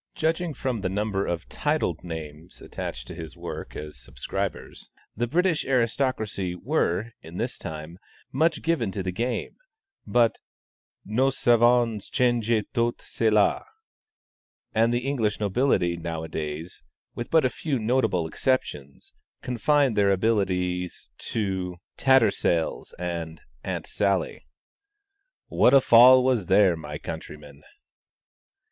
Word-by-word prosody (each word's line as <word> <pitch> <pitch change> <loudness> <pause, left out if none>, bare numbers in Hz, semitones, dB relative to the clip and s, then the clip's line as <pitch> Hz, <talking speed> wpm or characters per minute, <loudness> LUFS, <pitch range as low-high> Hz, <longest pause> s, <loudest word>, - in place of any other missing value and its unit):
Judging 165 +1 0
from 125 -5 -2
the 95 - -1
number 100 0 -1
of 85 -1 -3
titled 145 - -1
names 80 0 -8
attached - - -6
to - - -9
his 80 -3 -9
work - - -7
as 75 -2 -8
subscribers, 65 +1 -5 0.3
the 120 +3 -1
British 170 +3 +1
aristocracy 115 -7 0
were, 115 - -1
in 80 +2 -10
his 120 +4 -2
time, 80 +2 -8 0.3
much 160 -1 +1
given 155 -12 0
to 95 0 -4
the 90 - -2
game, 120 +6 -3 0.5
but 120 -2 +2 0.7
"nous 130 +7 0
avons 120 -3 +4
changé 120 -3 +1
tout 120 0 0
cela," 105 -2 +1 1.1
and 115 +1 +3
the 120 +1 -1
English 115 -7 0
nobility 100 -4 +1
nowadays, 80 -1 -5 0.3
with 120 - -6
but 160 -4 +4
a - - +6
few 140 +2 -2
notable 110 -7 +1
exceptions, 80 - -2 0.3
confine 135 +2 +2
their 100 -1 +3
abilities 90 -3 0
to 95 -4 -2 0.2
"Tattersall's" 110 -10 +2
and 85 -2 -4 0.2
"Aunt - - -4
Sally." 100 -9 -1 1.0
"What 130 - +4
a - - +9
fall 130 +1 +7
was 125 -8 +1
there, 95 -2 +5
my 75 -2 -7
countrymen!" 75 -1 -9
105 Hz, 120 wpm, -25 LUFS, 85-125 Hz, 1.1 s, a